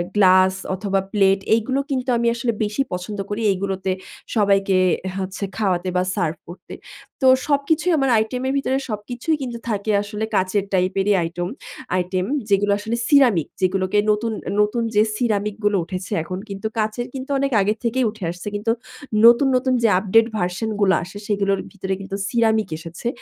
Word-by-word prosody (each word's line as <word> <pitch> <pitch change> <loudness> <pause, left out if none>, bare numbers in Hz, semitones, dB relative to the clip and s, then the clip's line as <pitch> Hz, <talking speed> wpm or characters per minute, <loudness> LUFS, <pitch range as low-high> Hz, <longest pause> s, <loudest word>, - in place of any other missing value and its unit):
Glass 185 -1 +5 0.2
অথবা, 195 0 -1
plate 195 -2 +4 0.2
এগুলো 260 +5 0
কিন্তু 255 -1 -1
আমি 235 0 +1
আসলে 235 0 -1
বেশি 210 +6 -1
পছন্দ 190 +3 -5
করি, 210 +2 -3
এগুলোতে 190 0 -2 0.4
সবাইকে 195 -2 +3 0.4
হচ্ছে 190 +1 -4
খাওয়াতে 185 -4 0
বা 180 - +2
সার্ভ 170 -6 -1
করতে। 175 - -11 0.5
তো 265 - +4 0.2
সবকিছুই 295 +5 +1
আমার 270 -2 +2
আইটেমের 250 +5 -1
ভিতরে 265 -1 0
সবকিছুই 240 +8 -2
কিন্তু 245 -3 -4
থাকে 210 0 -1
আসলে 210 +1 -4
কাঁচের 190 +2 +1
টাইপেরই 190 +2 +2
আইটেম 175 +2 -3 0.5
আইটেম। 185 +1 -1 0.2
যেগুলো 200 +1 +3
আসলে 225 +3 -3
সিরামিক, 245 - +4
যেগুলোকে 185 +2 +1
নতুন 220 +2 -1 0.3
নতুন 230 +3 +1
যে 210 - +6
সিরামিক 210 -3 0
গুলো 205 -1 +3
উঠেছে 185 +3 -6
এখন। 185 +2 -5
কিন্তু 195 +2 -4
কাঁচের 220 +2 -1
কিন্তু 265 0 -6
অনেক 275 0 0
আগে 210 +2 +2
থেকেই 245 +2 +1
উঠে 215 -4 -11
আসছে। 180 +3 -9
কিন্তু 215 +2 0 0.5
নতুন, 240 +4 +7
নতুন 255 0 +1
যে - - +6
আপডেট 225 +3 +3
ভার্শন 180 +4 -2 0.2
গুলো 190 -1 +4
আসে, 180 +4 -9
সেগুলোর 200 -2 +1
ভিতরে 190 -1 -4
কিন্তু 195 0 -6
সিরামিক 220 -4 +2
এসেছে। 165 +7 -7
205 Hz, 160 wpm, -21 LUFS, 190-235 Hz, 0.5 s, নতুন